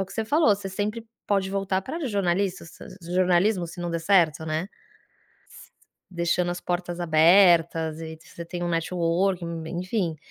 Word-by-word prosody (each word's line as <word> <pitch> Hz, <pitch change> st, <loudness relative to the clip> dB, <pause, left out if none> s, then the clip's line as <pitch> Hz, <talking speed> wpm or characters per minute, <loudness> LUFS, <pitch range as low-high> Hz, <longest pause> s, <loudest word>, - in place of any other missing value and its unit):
o -, -, -5 dB
que -, -, -13 dB
você 225 Hz, -, -2 dB
falou, 300 Hz, +4 st, +3 dB
você 195 Hz, -1 st, -7 dB
sempre 210 Hz, +4 st, -4 dB, 0.2 s
pode 195 Hz, -2 st, 0 dB
voltar 195 Hz, -1 st, -1 dB
para 300 Hz, -, -5 dB
os 250 Hz, -, -2 dB
jornalistas, 190 Hz, -2 st, -1 dB, 0.3 s
jornalismo, 180 Hz, +2 st, +1 dB
se 170 Hz, +1 st, -10 dB
não 175 Hz, -1 st, -3 dB
der 170 Hz, -, -2 dB
certo, 165 Hz, -3 st, +3 dB
né. 155 Hz, +1 st, -1 dB
S 195 Hz, -, -9 dB, 1.4 s
deixando 175 Hz, +1 st, 0 dB
as 175 Hz, 0 st, -4 dB
portas 175 Hz, 0 st, -3 dB
abertas 165 Hz, -1 st, +4 dB
e 160 Hz, -1 st, -8 dB
você 170 Hz, -, -10 dB
tem 175 Hz, +1 st, -5 dB
um -, -, -1 dB
networking, 170 Hz, 0 st, -1 dB, 0.2 s
enfim, 180 Hz, -3 st, -2 dB
175 Hz, 165 wpm, -25 LUFS, 170-195 Hz, 1.4 s, abertas